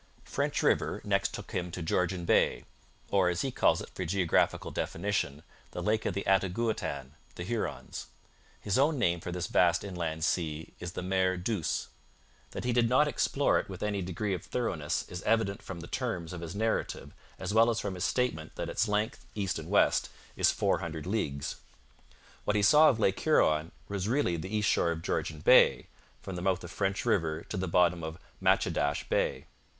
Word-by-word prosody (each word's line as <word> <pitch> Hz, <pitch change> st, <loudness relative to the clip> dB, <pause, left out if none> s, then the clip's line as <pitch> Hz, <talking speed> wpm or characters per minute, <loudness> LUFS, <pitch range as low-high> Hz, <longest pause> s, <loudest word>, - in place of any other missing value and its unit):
French -, -, -1 dB
River -, -, +2 dB
next -, -, +1 dB
took -, -, -8 dB
him 90 Hz, -1 st, -2 dB
to 90 Hz, 0 st, -5 dB
Georgian 90 Hz, +1 st, 0 dB
Bay, -, -, +2 dB, 0.5 s
or, 95 Hz, -3 st, +4 dB
as 85 Hz, -1 st, -1 dB
he 135 Hz, -, -1 dB
calls -, -, +3 dB
it -, -, -9 dB
for 95 Hz, -, -4 dB
geographical 90 Hz, -1 st, +1 dB
definition, 80 Hz, -6 st, -2 dB, 0.3 s
the -, -, -4 dB
Lake 110 Hz, +1 st, +1 dB
of 95 Hz, -, -2 dB
the 100 Hz, -, -2 dB
Attigouautan 95 Hz, -, 0 dB, 0.3 s
[Hurons]. 105 Hz, +6 st, -4 dB, 0.5 s
His 100 Hz, +4 st, 0 dB
own 145 Hz, +2 st, +3 dB
name 85 Hz, -8 st, +2 dB
for 90 Hz, -, -6 dB
this 90 Hz, 0 st, -2 dB
vast 85 Hz, -1 st, +3 dB
inland 85 Hz, -5 st, -3 dB
sea 80 Hz, -3 st, -1 dB
is 90 Hz, -1 st, -6 dB
the -, -, -4 dB
Mer 95 Hz, 0 st, +1 dB
Douce. 90 Hz, -2 st, -2 dB, 0.6 s
That -, -, -6 dB
he 125 Hz, 0 st, 0 dB
did 115 Hz, -1 st, +3 dB
not 140 Hz, +4 st, +4 dB
explore 145 Hz, -1 st, +2 dB
it -, -, -6 dB
with 95 Hz, 0 st, -6 dB
any 105 Hz, -2 st, -1 dB
degree 95 Hz, +3 st, -2 dB
of 90 Hz, -, -4 dB
thoroughness 85 Hz, -10 st, -2 dB
is 90 Hz, 0 st, -6 dB
evident 110 Hz, -1 st, +1 dB
from 90 Hz, -3 st, -7 dB
the -, -, -7 dB
terms 90 Hz, -10 st, -3 dB
of 85 Hz, -, -6 dB
his 85 Hz, +2 st, -6 dB
narrative 110 Hz, +2 st, -2 dB, 0.2 s
as -, -, -4 dB
well 115 Hz, +1 st, +6 dB
as 115 Hz, -, 0 dB
from 100 Hz, -, -3 dB
his 90 Hz, -1 st, -4 dB
statement 125 Hz, -13 st, -1 dB
that -, -, -4 dB
its 110 Hz, -, +1 dB
length, 105 Hz, +3 st, -1 dB
east 100 Hz, -3 st, -1 dB
and -, -, -8 dB
west, -, -, +3 dB, 0.3 s
is -, -, +4 dB
four -, -, +1 dB
hundred 80 Hz, -2 st, -5 dB
leagues. 75 Hz, -9 st, -2 dB, 0.9 s
What 105 Hz, -, 0 dB
he 105 Hz, -, +2 dB
saw 155 Hz, +7 st, +7 dB
of 120 Hz, -, 0 dB
Lake 95 Hz, -3 st, +2 dB
Huron 80 Hz, -, +3 dB, 0.2 s
was 100 Hz, -1 st, -3 dB
really 125 Hz, -9 st, +1 dB
the 85 Hz, +3 st, -5 dB
east 105 Hz, -1 st, +1 dB
shore 85 Hz, -, +3 dB
of 85 Hz, 0 st, -3 dB
Georgian 75 Hz, -2 st, -2 dB
Bay, -, -, +6 dB, 0.4 s
from 95 Hz, -, -6 dB
the 90 Hz, -, -4 dB
mouth 95 Hz, 0 st, 0 dB
of 90 Hz, -, -8 dB
French 95 Hz, +3 st, -1 dB
River 80 Hz, -8 st, +1 dB
to -, -, -6 dB
the 95 Hz, 0 st, -2 dB
bottom 85 Hz, 0 st, +3 dB
of 80 Hz, +1 st, -5 dB, 0.2 s
Matchedash 70 Hz, 0 st, +1 dB
Bay. -, -, 0 dB
95 Hz, 190 wpm, -30 LUFS, 85-105 Hz, 0.9 s, saw